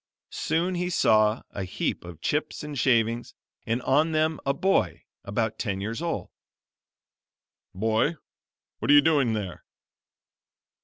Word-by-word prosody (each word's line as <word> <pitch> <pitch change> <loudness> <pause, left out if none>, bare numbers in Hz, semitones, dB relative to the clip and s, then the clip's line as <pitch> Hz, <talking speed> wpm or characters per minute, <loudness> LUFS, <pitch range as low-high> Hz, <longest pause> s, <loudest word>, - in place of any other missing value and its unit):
Soon 170 +4 0
he 180 0 -1
saw 110 -9 +3
a 100 - -4
heap 95 - -3
of 85 -2 -10
chips 150 0 -1
and 150 -1 -6
shavings, 120 -2 +1 0.3
and 115 +3 -1
on 155 +4 +2
them 155 0 +1
a - - +4
boy 190 +8 +1 0.2
about 110 +1 -2
ten 100 -5 -2
years 115 +8 -4
old. 170 -1 -3 1.4
"Boy, 110 - +1 0.6
what - - -3
are 145 - +8
you 145 - +9
doing 145 -7 +3
there?" 100 -5 -4
120 Hz, 135 wpm, -26 LUFS, 110-155 Hz, 1.4 s, you